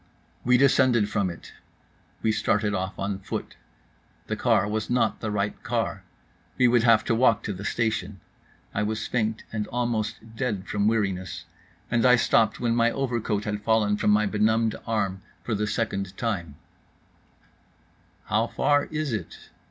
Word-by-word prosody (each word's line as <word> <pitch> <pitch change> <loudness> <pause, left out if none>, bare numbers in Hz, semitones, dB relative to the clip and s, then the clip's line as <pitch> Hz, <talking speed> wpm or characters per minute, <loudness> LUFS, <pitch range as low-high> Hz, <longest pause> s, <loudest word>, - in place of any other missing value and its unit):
We 125 0 +4
descended 130 -5 +4
from 100 -3 0
it. 85 - -10 0.7
We 110 - +3
started 105 -1 +1
off 95 0 -3
on 100 0 -3
foot. 95 - -5 0.7
The - - -2
car 100 - +2
was 105 0 -2
not 120 -1 +1
the 110 - -3
right 105 0 -2
car. 115 -5 -2 0.6
We 125 - +5
would 120 -1 +4
have 115 -2 +5
to - - 0
walk 115 -2 +3
to 105 - -3
the 95 +2 -8
station. 105 -3 -1 0.5
I 105 - -1
was 110 +1 -2
faint 110 -2 -1
and 105 -1 -2
almost 115 -2 -3
dead 110 -7 -2
from 105 0 0
weariness 95 -4 -1 0.5
and 120 -1 +2
I 125 -1 +7
stopped 115 -2 +2
when 115 -1 +1
my 120 0 +4
overcoat 120 -5 -1
had 105 0 -3
fallen 105 -2 +2
from 105 - 0
my 105 +1 +4
benumbed 110 +2 +2
arm 100 -4 -1 0.2
for 115 - -2
the 105 0 -1
second 100 -3 -2
time: 90 - -3 1.7
"How 110 +2 +1
far 145 +3 +2
is 155 -4 -3
it?" 100 -7 -6
110 Hz, 160 wpm, -26 LUFS, 105-115 Hz, 1.7 s, I